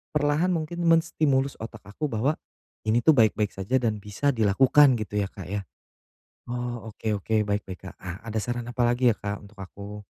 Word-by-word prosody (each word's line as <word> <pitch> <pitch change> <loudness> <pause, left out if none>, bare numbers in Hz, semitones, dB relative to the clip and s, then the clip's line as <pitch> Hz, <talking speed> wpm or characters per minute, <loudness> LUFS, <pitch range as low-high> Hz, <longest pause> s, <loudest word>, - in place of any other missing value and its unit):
perlahan 150 +3 +2
mungkin 165 +2 -3
menstimulus 155 -5 +2
otak 110 -1 -8
aku 105 +11 -4
bahwa 135 +5 0 0.5
ini 115 +2 +3
tuh 160 - +7
baik-baik 110 -6 +3
saja 95 +6 -2
dan 110 -2 0
bisa 105 +8 0
dilakukan, 130 +5 +5
gitu, 105 -2 -2
ya, 100 - 0
Kak, 95 -2 -9
ya? 100 -1 -3 0.9
Oh, 120 -2 -4
oke 105 0 -2
oke, 105 +1 0
baik 100 0 0
baik, 95 -2 -8
Kak, - - -12
ah, 90 +2 -7
ada 110 0 -6
saran 120 -1 -3
apalagi 120 +1 +2
ya 115 - +3
Kak 100 0 -4
untuk 105 +1 -16
aku? 100 +2 -9
110 Hz, 185 wpm, -26 LUFS, 105-130 Hz, 0.9 s, tuh